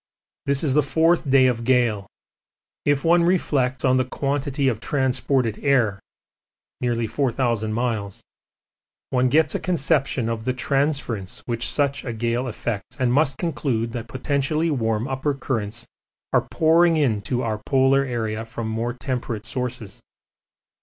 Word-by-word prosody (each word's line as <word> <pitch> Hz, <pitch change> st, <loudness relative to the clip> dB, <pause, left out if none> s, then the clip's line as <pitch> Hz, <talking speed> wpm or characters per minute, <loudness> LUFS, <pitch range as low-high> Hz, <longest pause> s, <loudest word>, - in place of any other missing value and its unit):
This 140 Hz, +1 st, +1 dB
is 140 Hz, -4 st, +1 dB
the 150 Hz, -, +5 dB
fourth 160 Hz, +1 st, +2 dB
day 130 Hz, -1 st, +6 dB
of 120 Hz, -2 st, +1 dB
gale; 115 Hz, -5 st, +2 dB, 0.8 s
if 145 Hz, 0 st, +1 dB
one 170 Hz, +1 st, +5 dB
reflects 135 Hz, -8 st, +1 dB
on 130 Hz, 0 st, +4 dB
the 130 Hz, -, +3 dB
quantity 140 Hz, +1 st, -1 dB
of 115 Hz, -5 st, 0 dB
transported 130 Hz, -3 st, 0 dB
air 120 Hz, -8 st, +2 dB, 0.8 s
(nearly 120 Hz, -2 st, 0 dB
4,000 120 Hz, -2 st, 0 dB
miles) 110 Hz, -4 st, -2 dB, 0.9 s
one 125 Hz, 0 st, +2 dB
gets 155 Hz, +2 st, +3 dB
a -, -, -1 dB
conception 140 Hz, -7 st, 0 dB
of 115 Hz, -1 st, -3 dB
the 130 Hz, +2 st, 0 dB
transference 130 Hz, -6 st, -1 dB
which 120 Hz, -1 st, -2 dB
such 140 Hz, -1 st, 0 dB
a 120 Hz, -, -4 dB
gale 120 Hz, +3 st, -1 dB
effects 115 Hz, -1 st, -5 dB
and 125 Hz, -1 st, +2 dB
must 140 Hz, 0 st, +2 dB
conclude 130 Hz, -9 st, -1 dB
that 115 Hz, -1 st, -5 dB
potentially 140 Hz, +6 st, 0 dB
warm 115 Hz, -3 st, 0 dB
upper 135 Hz, +2 st, -1 dB
currents 120 Hz, -3 st, -3 dB, 0.5 s
are -, -, +2 dB
pouring 165 Hz, +1 st, +4 dB
into 125 Hz, -3 st, 0 dB
our 110 Hz, -2 st, -2 dB
polar 135 Hz, 0 st, +4 dB
area 115 Hz, -4 st, -3 dB
from 115 Hz, 0 st, -6 dB
more 115 Hz, +2 st, -2 dB
temperate 120 Hz, -4 st, -4 dB
sources. 125 Hz, -5 st, -5 dB
130 Hz, 140 wpm, -23 LUFS, 115-140 Hz, 0.9 s, day